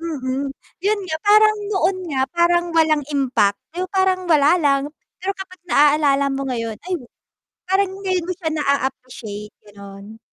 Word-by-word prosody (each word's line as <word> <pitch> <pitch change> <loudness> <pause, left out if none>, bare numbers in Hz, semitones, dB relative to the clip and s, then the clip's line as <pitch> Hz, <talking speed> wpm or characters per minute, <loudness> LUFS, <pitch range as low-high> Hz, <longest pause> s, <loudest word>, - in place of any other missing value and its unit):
Mm, 275 -4 -3 0.3
yun 410 +2 +1
nga 315 -3 -3
parang 430 0 +6
noon 385 -1 +1
nga 265 -4 0
parang 345 0 +2
walang 315 -3 +3
impact 245 -8 +1
pero 360 +2 -3
parang 375 -1 +1
wala 310 -1 +4
lang, 275 -3 +2 0.4
pero 380 +2 -1
kapag 370 -1 -10
naalala 285 -2 +4
mo 270 0 -3
ngayon 230 -3 -3
ay - - -3 0.8
parang 385 +1 +1
ngayon 370 -3 -1
mo 365 - -1
siya 335 -3 -3
na-a-appreciate, 255 -8 -3
gano'n. 200 +1 -12
300 Hz, 145 wpm, -20 LUFS, 260-370 Hz, 0.8 s, parang